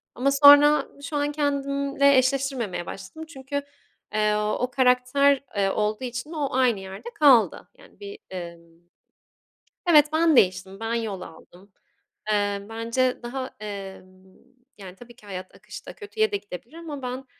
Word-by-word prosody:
ama 270 +3 +1
sonra 290 +1 +7 0.2
şu 285 +2 -5
an 290 0 0
kendimle 280 -1 +1
eşleştirmemeye 260 -8 -1
başladım, 195 - -9
çünkü, 285 -2 -5 0.5
eee, 210 0 +2
o 210 +4 -1
karakter, 260 +2 +3
eee, 200 -1 +1
olduğu 210 +4 -1
için 250 +4 -5
o 295 -4 -2
aynı 250 -5 +2
yerde 190 - -9
kaldı. 265 -7 +4
Yani, - - -20
bir, 410 0 -9
emm, 170 -2 -9 1.1
evet, 300 -3 +6
ben 320 -1 +3
değiştim. 190 -2 +2
Ben 225 +1 -3
yol 220 -5 -3
aldım. 180 +4 -14 0.6
Eee, 205 -1 0
bence 230 +3 -1
daha, 255 +2 -5
emm, 200 -3 -8 0.7
yani, 190 -3 -11
tabii 240 +3 -15
ki 215 - -20
hayat 185 -2 -8
akışta - - -11
kötüye 435 0 -2
de - - 0
gidebilir 200 - -11
ama 310 -4 -7
ben 255 +1 -5
250 Hz, 140 wpm, -24 LUFS, 200-280 Hz, 1.1 s, sonra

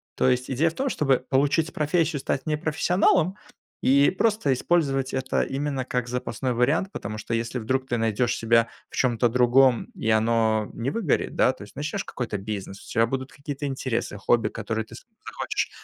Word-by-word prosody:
То 130 - +3
есть 125 +1 0
идея 145 +6 +2
в 160 - -10
том, 270 +6 -1
чтобы 135 - +2
получить 145 +4 +2
профессию, 155 0 +1
стать 135 0 -2
не 150 - +1
профессионалом 180 +3 +2 0.5
и 140 +2 +5
просто 210 -7 +1
использовать 135 -3 0
это 130 0 0
именно 135 -1 -2
как 125 -1 -2
запасной 125 0 -2
вариант. 150 +11 +1
Потому 110 - -5
что, 115 - -3
если 115 +2 -2
вдруг 130 +4 -1
ты 120 - -1
найдёшь 115 +1 +1
себя 115 0 +3 0.2
в - - -10
чём-то 120 -2 +2
другом, 125 +1 +4
и 110 - -3
оно 110 -1 +2
не 120 +3 -2
выгорит, 180 -2 -1
да, 130 - +4
то - - -16
есть 100 - -14
начнёшь 155 +7 -3
какой-то 115 -5 -4
бизнес, 100 -1 -6
у - - -14
тебя 115 -1 +3
будут 130 +2 -4
какие-то 145 0 -5
интересы, 130 -6 -3
хобби, 115 +4 +2
которые 110 -1 -3
ты 115 - -13
с - - -13 0.2
захочешь - - -2
130 Hz, 185 wpm, -25 LUFS, 115-145 Hz, 0.5 s, и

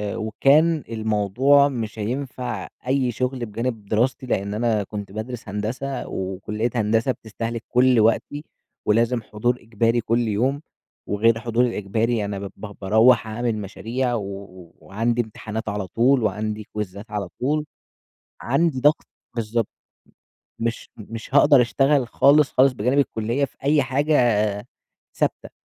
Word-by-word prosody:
وكان 140 +9 +3
الموضوع 115 +6 +3
مش 110 -4 -5
هينفع 125 +3 -4 0.2
أي 130 -2 +1
شغل 125 +1 -2
بجانب 115 0 -4
دراستي، 120 +5 0
لأن 100 -4 -1
أنا 110 -2 +1
كنت 100 -1 -7
بادرس 110 +1 -6
هندسة، 125 +6 -3
وكلية 100 +5 -3
هندسة 115 +3 +2
بتستهلِك 115 0 -5
كل 125 -1 +4
وقتي، 145 +7 +1 0.4
ولازم 115 +2 +2
حضور 120 +3 -1
إجباري 115 +1 +1
كل 115 +1 0
يوم، 130 +8 0 0.5
وغير 115 +3 +3
الحضور 115 +1 0
الإجباري، 110 0 -1
أنا 100 -1 -4
ب 100 -1 -6
ب 105 -1 -8
باروّح 110 +4 +4
أعمل 115 +1 -2
مشاريع 115 +5 -3
و 95 -5 -7
وعندي 115 +9 -1
امتحانات 110 0 -6
على 100 -2 -3
طول، 125 +3 +3
وعندي 110 0 -2
كويزات 105 0 -6
على 100 -3 -3
طول، 150 +3 0 0.8
عندي 140 +1 +1
ضغط، 150 +3 +3 0.3
بالضبط، 115 0 -1 0.9
مش 115 0 -3
مش 115 +4 -9
هاقدر 145 -2 +7
أشتغل 135 +3 +2
خالص، 145 +1 +4
خالص 130 +1 +5
بجانب 125 +5 0
الكلية 120 +1 0
في - - -9
أي 145 0 +4
حاجة 140 +4 0 1.0
ثابتة، - - -2
115 Hz, 130 wpm, -23 LUFS, 105-130 Hz, 1.0 s, هاقدر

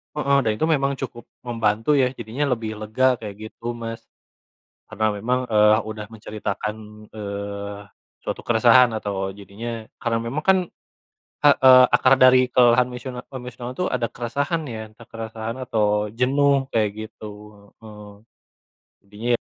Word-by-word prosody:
heeh, 140 -2 +2
dan 110 - +2
itu 155 - 0
memang 140 -3 +2
cukup 120 -3 -7 0.2
membantu 115 +3 +1
ya, 130 -2 +4
jadinya 120 +5 -3
lebih 110 -2 -5
lega, 125 +4 +1
kayak 105 -3 -7
gitu, 120 +2 -6
Mas. 115 -1 -7 0.8
Karena 110 0 -1
memang, 125 +4 -1
eee, 105 0 +5
udah 110 0 -7
menceritakan, 105 -1 -4 0.3
eee, 100 -1 -6 0.4
suatu - - -4
keresahan 120 +2 +5
atau 100 -3 -3
jadinya 110 +3 -7 0.2
karena 115 -1 0
memang 115 +6 -3
kan 190 +2 +4 0.9
heeh, 130 -3 +7
akar 135 - +4
dari 130 0 +6
kelelahan 125 0 +4
emosional-emosional 125 -1 -7
tuh 180 - +1
ada 120 -2 -1
keresahan 140 +7 -2
ya, 110 -3 -7
entah 115 +1 -17
keresahan 115 0 -6
atau 105 -3 0
jenuh 135 +3 +2
kayak 110 -2 +2 0.2
gitu, 110 - -11 0.5
heeh. 105 -2 -12 0.9
Intinya 105 +5 -3
115 Hz, 135 wpm, -22 LUFS, 110-125 Hz, 0.9 s, heeh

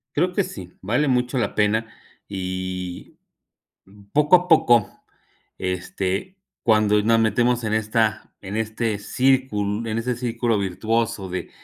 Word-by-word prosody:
Creo 180 +5 +2
que 190 +1 0
sí, 90 -3 -9
vale 120 +9 +1
mucho 125 +1 +1
la 115 -5 -1
pena. 110 +2 +1 0.4
Y, 95 -2 -5 0.7
mm, 100 +1 -18
poco 150 +4 +4
a 180 0 -3
poco, 120 - +5 0.7
este, 95 - -3 0.2
cuando 105 -2 +3
nos 115 +1 +3
metemos 120 +2 +2
en 110 0 0
esta 110 -1 0
en 100 +1 -6
este 110 -1 -1
círculo 115 -2 0
en 110 - -1
ese 125 +2 -1
círculo 120 -2 0
virtuoso 100 +1 -1
de 90 - -4
110 Hz, 135 wpm, -23 LUFS, 100-120 Hz, 0.7 s, poco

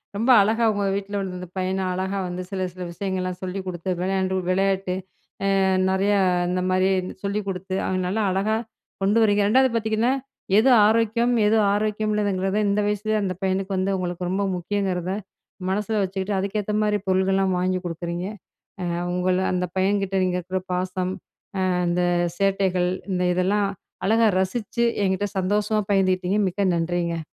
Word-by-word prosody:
ரொம்ப 230 +5 0
அழகா 220 +3 +1
உங்க 205 -1 -1
வீட்ல 200 +1 -3
உள்ள 190 -1 -4
இந்த 180 - -7
பையன 185 +1 -1
அழகா 190 +2 -2
வந்து 180 +1 -4
சில 190 -1 -2
சில 180 0 -8
விஷயங்கள்லாம் 185 0 -3
சொல்லிக் 190 +1 -4
குடுத்து 180 0 -5
விளையாண்டு 190 0 0
விளையாட்டு. 190 0 +1 0.7
அ - - +3 0.3
நிறைய 195 +2 +2 0.3
இந்த 180 0 0
மாரி 185 +1 +3 0.3
சொல்லிக் 200 0 -2
குடுத்து 190 0 -4
அவங்க 185 0 -1
நல்லா 215 +4 0
அழகா 205 +4 +1 0.5
கொண்டு 205 +4 +3
வரீங்க. 205 -1 +3
2ஆவது 260 +3 +4
பார்த்தீங்கன்னா, 220 +3 +1 0.5
"எது 260 +4 +5 0.2
ஆரோக்கியம்? 230 +2 +2
எது 220 +2 +4 0.2
ஆரோக்கியம் 215 0 0
இல்லங்கிறத?" 195 -1 0
இந்த 205 +1 +2
வயசுலேயே 210 +1 0
அந்த 185 -2 -1
பையனுக்கு 190 0 0
வந்து 190 +1 0
உங்களுக்கு 180 0 -3
ரொம்ப 200 +2 0
முக்கியங்கிறத 185 -1 -2 0.6
மனசில 210 +2 0
வச்சுக்கிட்டு 190 +1 -2
அதுக்கேத்த 205 +1 -2
மாரி 210 -1 +2
பொருட்கள்லாம் 190 0 +2
வாங்கி 185 0 0
கொடுக்குறீங்க. 170 +1 -4 0.9
உங்கள 180 0 +1
அந்த 180 0 0
பையன்கிட்ட 195 0 +1
நீங்க 180 0 0
இருக்கிற 185 +2 -3
பாசம், 185 0 -1 0.7
அந்த 175 +1 +1 0.4
சேட்டைகள் 190 -2 +1 0.2
இந்த 180 0 0
இதெல்லாம் 195 +3 +1 0.4
அழகா 225 +2 +4
ரசிச்சு 225 +5 -1 0.2
என்கிட்ட 190 +2 0
சந்தோஷமா 210 +3 +1
பகிர்ந்துகிட்டிங்க. 185 0 +2
மிக்க 190 0 0
நன்றிங்க. 170 0 -1
190 Hz, 145 wpm, -24 LUFS, 185-205 Hz, 0.9 s, எது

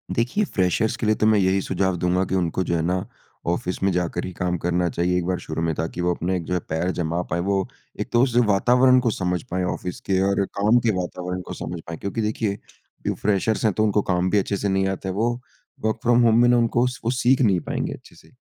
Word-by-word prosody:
देखिए, 125 - +1
फ्रेशर्स 95 - 0
के 115 - -3
लिए 110 - +3
तो 110 - 0
मैं 110 -1 +4
यही 95 0 +2
सुझाव 95 -1 0
दूँगा 90 +2 +1
कि 95 - -2
उनको 90 0 0
जो 85 - -1
है 80 - 0
ना, 90 +2 -1 0.4
ऑफ़िस 90 +2 -2
में 100 - +3
जाकर 90 -1 -1
ही 95 - -5
काम 90 +1 -1
करना 90 +1 0
चाहिए 90 +2 0
एक 90 - -1
बार 90 0 0
शुरू 80 +1 -5
में, 80 -1 0
ताकि 80 +3 -3
वो 90 0 +1
अपने 90 +2 -2
एक 85 - -5
जो 90 - -4
है, 90 - +1
पैर 80 +4 0
जमा 85 -1 -2
पाएँ। 85 +2 -1
वो 95 +1 0 0.3
एक - - -3
तो 120 - +5
उस 125 -3 0
वातावरण 125 +5 +4
को 120 -2 +1
समझ 90 -3 -1
पाएँ 90 +1 0
ऑफ़िस 90 -1 -6
के 95 -1 +3
और 100 0 +1
काम 105 +5 +2
के 110 - +4
वातावरण 90 0 -4
को - - -5
समझ 85 0 -6
पाएँ। 85 -1 -5
क्योंकि 105 +3 -3
देखिए, 105 -1 -1 0.5
जो - - +2
फ्रेशर्स 105 +2 0
हैं, 105 - +3
तो 110 - +1
उनको 105 -1 +2
काम 90 0 +2
भी 105 - +2
अच्छे 100 +1 -1
से 100 - -1
नहीं 95 0 +1
आता 95 0 -3
है। - - -2
वो 115 +4 +1 0.5
वर्क 110 +1 0
फ्रॉम 120 0 +4
होम 115 0 +5
में 120 - +5
ना, 125 - +5
उनको 120 +1 +2
स 125 - -5
वो 120 - +2
सीख 125 +1 +2
नहीं 100 -7 +3
पाएँगे - - -2
अच्छे - - -14
से। - - -19
95 Hz, 260 wpm, -23 LUFS, 90-110 Hz, 0.5 s, तो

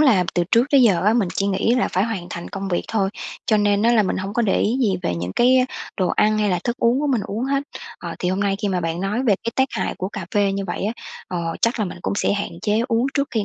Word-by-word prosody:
là 225 -12 +5
từ 175 - +2
trước 240 +2 +4
tới 275 -2 +6
giờ 190 -8 +4
á, 210 - +5
mình 220 -6 +2
chỉ 200 - 0
nghĩ 200 +4 +1
là 250 - +1
phải 185 +2 +2
hoàn 215 -6 -4
thành 170 - -6
công 195 -1 -5
việc 175 - 0
thôi, 195 -3 0 0.4
cho 215 - +3
nên 205 0 +2
á 235 +1 +4
là 220 - +5
mình 190 - -1
hông 195 +2 -4
có 240 - +2
để 200 - +2
ý 225 +4 +1
gì 200 -6 +2
về 130 - -1
những 90 +2 -4
cái 255 - +4 0.3
đồ 185 -3 +1
ăn 215 0 +2
hay 210 -1 +2
là 180 - +1
thức 240 0 -1
uống 235 +3 +2
của 295 - 0
mình 255 -5 +1
uống 220 +5 -3
hết. 275 +1 0 0.4
Ờ, - - -6
thì 180 - -1
hôm 190 +2 -1
nay 200 -1 +1
khi 205 - +1
mà 180 -2 0
bạn 165 +1 -2
nói 205 +6 -1
về 225 -6 +4
cái 230 - -1
tác 265 0 +3
hại - - -2
của 185 - -2
cà 200 -4 -6
phê 200 -1 +3
như 195 0 -2
vậy 175 - -3
á, 215 - 0 0.4
ờ, 170 -2 -3
chắc 230 +2 +2
là 215 - +1
mình 180 -2 -7
cũng - - -1
sẽ 200 - +1
hạn 205 0 -2
chế 215 +1 +1
uống 235 +2 +2
trước 280 -1 0
khi 220 -3 0
205 Hz, 305 wpm, -21 LUFS, 190-235 Hz, 0.4 s, tới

